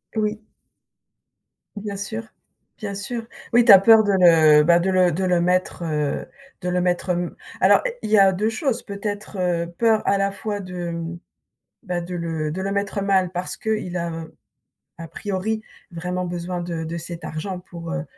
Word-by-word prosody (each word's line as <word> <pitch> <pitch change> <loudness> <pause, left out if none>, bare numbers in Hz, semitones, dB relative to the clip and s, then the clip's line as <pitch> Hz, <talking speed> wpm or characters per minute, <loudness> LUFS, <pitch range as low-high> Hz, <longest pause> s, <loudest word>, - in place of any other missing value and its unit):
Oui. 215 0 -2 1.3
Bien 205 -1 -5
sûr, 220 +3 -4 0.5
bien 200 -2 -5
sûr. 225 +3 -5 0.2
Oui, 240 0 +5
tu 230 - +8
as 190 - +10
peur 220 +2 +7
de 200 - +2
le 160 -5 +6
bah 170 +2 +5
de 190 +2 0
le 185 -2 +4
de 185 +4 -1
le 180 -1 +2
mettre, 180 0 0
heu 150 -3 -1 0.4
de 180 - -2
le 180 0 +1
mettre 180 +1 0
m 175 0 -1 0.2
alors, - - +5 0.2
il - - -4
y 215 - +6
a 195 -1 +7
2 205 +4 -1
choses, 255 +1 -1
peut-être, 205 0 -5
heu, 175 -2 0
peur 225 -2 +3
à 200 - +3
la 195 0 +1
fois 205 0 -4
de, 180 -2 -5 0.9
bah 180 -3 -2
de 175 +1 -6
le 160 -3 -2
de 190 - -4
le 195 +1 -2
mettre, 200 0 -1
heu, - - -2
mal. 190 -2 +2
Parce 185 +1 -4
qu'il 215 -5 -2
a, 165 -1 -4 0.7
à 165 -1 -8
priori 205 +5 -3 0.3
vraiment 180 +2 -3
besoin 175 0 -4
de 170 -2 -4
de 165 +1 -4
cet 170 0 -7
argent 180 +4 -5
pour 170 -2 -8
heu 175 - -2
185 Hz, 185 wpm, -22 LUFS, 170-205 Hz, 1.3 s, as